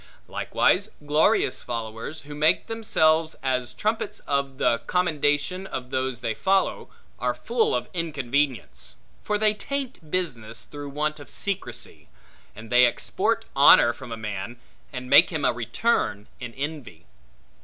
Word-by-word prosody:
Likewise 200 +3 +1 0.2
glorious 145 -3 +2
followers, 115 +5 -5
who 145 +1 -10
make 150 +2 +2
themselves 160 -8 +2
as 125 -2 0
trumpets 215 - -2
of 140 -1 -1
the 115 - +2
commendation 175 +1 0
of 130 -5 -6
those 130 -2 -2
they 115 -3 -1
follow, 190 - 0 0.3
are 125 -1 0
full 230 - 0
of 125 0 -2
inconvenience; 140 -5 -2 0.3
for 210 - 0
they 215 0 +3
taint 255 - -5
business 120 -11 -3
through 145 -1 -8
want 150 +2 -2
of 145 - -12
secrecy; 195 - -4 0.5
and 110 +2 -11
they 125 0 +6
export 120 - -1
honor 120 - +7
from 130 -2 -11
a 115 - -4
man, 105 +2 -5 0.3
and 125 -1 -6
make 160 - +7
him 155 -5 -2
a - - +3
return 120 - 0
in 125 -2 -6
envy. 140 - -6
145 Hz, 140 wpm, -25 LUFS, 120-170 Hz, 0.5 s, honor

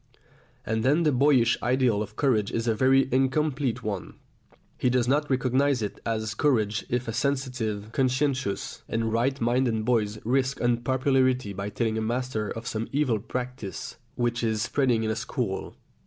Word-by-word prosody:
And 110 0 0
then 150 +6 +3
the 150 - +3
boyish 130 -3 +3
ideal 125 -4 +2
of 105 0 -6
courage 110 -8 +1
is 115 +1 -2
a 115 - +3
very 135 +3 +4
incomplete 135 0 +1
one. 100 -3 -4 0.6
He 125 - +2
does 125 -1 +1
not 145 +3 +1
recognise 130 0 +2
it 105 - -5
as 110 -1 -1
courage 110 -5 +1
if 125 0 -1
a 115 - -3
sensitive, 120 -5 -2
conscientious, 130 -4 -1
and 115 0 -1
right 130 +4 +1
minded 120 -2 +1
boy 115 -3 +2 0.2
risks 130 +3 0
unpopularity 130 -1 +1
by 100 +1 -4
telling 110 0 -1
a - - -2
master 115 -2 -2
of 115 +1 -6
some 115 -1 -3
evil 135 -6 +1
practice 125 -2 -5 0.2
which 120 0 -1
is 110 -1 0
spreading 125 -3 +1
in 110 - 0
a - - -1
school. 110 -3 -3
120 Hz, 160 wpm, -26 LUFS, 110-130 Hz, 0.6 s, very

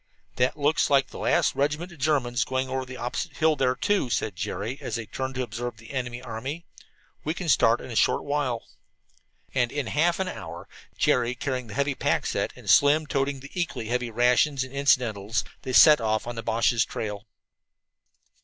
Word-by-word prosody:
"That 125 +4 +1
looks 150 +2 +2
like 140 -2 +3
the - - -9
last - - +2
regiment 150 +6 -1
of 170 - -14
the - - -5
Germans 120 -6 +1
going 130 +2 -2
over 130 0 -2
the 130 0 -9
opposite 135 +6 -4
hill 160 0 +3
there, 130 -2 +1
too," 195 +1 0
said 110 -4 -1
Jerry, 100 +8 -4
as - - -4
they 115 -1 -4
turned 130 +4 -5
to 130 - -1
observe 120 0 -5
the 115 0 -13
enemy 125 -2 -4
army. 135 +10 -5 0.6
"We 155 +2 -2
can 180 - -5
start 120 -5 +4
in 130 - -9
a - - -5
short - - +2
while." 140 -5 -1 0.9
And 120 -3 +1
in 145 -2 -2
half 165 +9 +1
an 190 - -1
hour, - - -7 0.3
Jerry 125 0 +2
carrying 125 -1 -3
the 110 - -9
heavy 140 +1 +1
pack - - 0
set - - -1
and - - -14
Slim 150 +2 +5
toting 140 -1 -1
the 140 - -11
equally 170 -11 -3
weighty 125 -1 0
rations 125 +4 +2
and 130 0 -10
incidentals, 110 -6 +1 0.2
they 130 - -5
set 150 +1 +8
off 110 -1 0
on 120 - -4
the 115 - -5
Boches' 115 +1 +2
trail. 105 0 -5
130 Hz, 195 wpm, -26 LUFS, 115-145 Hz, 0.9 s, set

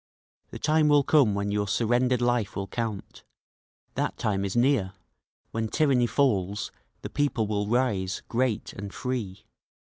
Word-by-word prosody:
The - - -7
time 155 0 +2
will 145 -1 +5
come 135 -9 +4
when 100 0 -1
your 105 0 0
surrendered 120 +3 +1
life 120 -4 0
will 100 - -2
count 110 0 -5 0.7
That - - -2
time 100 -2 -1
is 100 -1 -3
near; 120 -6 +2 0.6
when 115 0 -2
tyranny 130 -2 +2
falls 105 -8 0 0.3
the - - -5
people 140 -6 0
will 105 -1 -1
rise, 105 -6 0
great 120 -2 -1
and 100 0 -7
free! 115 -7 -4
115 Hz, 145 wpm, -27 LUFS, 100-130 Hz, 0.7 s, will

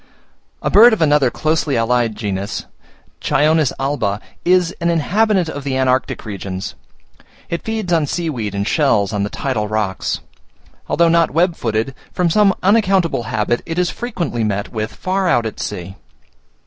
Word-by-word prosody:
A - - 0
bird 225 +3 +8
of 220 - -1
another 145 -4 +4
closely 155 0 0
allied 115 -1 +1
genus, 100 -1 -4 0.6
Chionis 155 -2 +2
alba, 125 -8 -1 0.2
is 180 0 +2
an 170 - +1
inhabitant 185 +3 +2
of 145 -3 -5
the 135 -1 -1
antarctic 130 -1 0
regions; 100 -1 -5 0.8
it 170 - -2
feeds 220 -5 -2
on 160 -3 +2
sea 170 +3 -2
weed 115 -9 -3
and 100 +1 -1
shells 115 - +2
on 105 - -1
the 100 - -1
tidal 115 -5 -2
rocks. 105 -3 -2 0.7
Although 170 +1 +3
not 170 0 +3
web 170 +3 +2
footed, 115 +1 -2 0.2
from 175 -2 +1
some 205 +1 +5
unaccountable 190 - +2
habit, 110 +3 0
it 165 0 -4
is 180 -1 +1
frequently 175 - -3
met 100 -1 -2
with 110 -1 -3
far 185 0 -1
out 120 -8 +2
at 110 - -5
sea. 95 -1 -5
140 Hz, 160 wpm, -18 LUFS, 110-175 Hz, 0.8 s, bird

